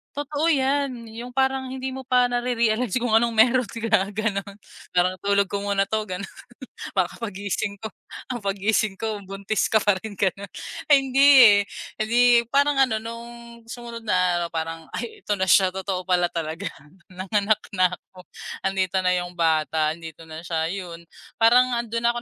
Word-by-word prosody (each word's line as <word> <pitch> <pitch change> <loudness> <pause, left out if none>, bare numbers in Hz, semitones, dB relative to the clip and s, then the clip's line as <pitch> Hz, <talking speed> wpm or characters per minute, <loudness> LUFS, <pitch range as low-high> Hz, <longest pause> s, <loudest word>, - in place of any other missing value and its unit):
totoo 290 +2 -2
yan, 270 -5 0
yung 245 +3 -9
parang 265 0 +1
hindi 260 0 -5
mo 265 0 -8
pa 250 -1 +4
nare-realize 240 -2 0
kung 245 -2 0
anong 230 +1 +3
meron 245 +1 +4
ka 220 -4 0
gano'n, 200 -2 -2 0.4
parang 185 +1 +2
tulog 200 +1 +2
ko 200 - -1
muna 200 -1 0
'to 215 +2 -2
gano'n, 185 +1 -5 0.7
para 185 -3 +1
kapag 230 -4 -7
gising 200 +1 -4
ko, 220 - -5 0.4
ah, 250 - -2
paggising 205 +1 0
ko 210 0 -5
buntis 195 +2 -2
ka 220 - +5
pa 205 -2 +2
rin 215 +3 -8
gano'n, 195 0 -1 0.4
ay 290 - +6
hindi, 270 0 0 0.8
eh, 215 - -1
di 240 +1 +4
parang 285 0 +3
ano 230 -5 +2
no'ng 230 +1 -7 0.4
sumunod 235 0 -9
na 180 -3 +2
araw - - -7
parang 165 0 -4
ay 235 -1 -6
ito 210 - 0
na 190 -2 -1
siya 185 +1 +5
totoo 190 -1 -4
pala 180 -2 +2
talaga 165 +3 -4 0.4
nanganak 200 +3 0
na 185 -1 +3
ako 180 0 -12 0.4
andito 190 -1 0
na 180 0 +2
yung 175 0 -4
bata, 160 -2 +1
andito 160 -1 -11
na 160 +2 -9
siya, 160 -1 -1
yun. 175 -3 -6 0.4
Parang, 245 +2 +5
ah, 235 - +1
dun 230 0 -4
na 235 - +3
ako 240 - -5
210 Hz, 175 wpm, -24 LUFS, 185-240 Hz, 0.8 s, ay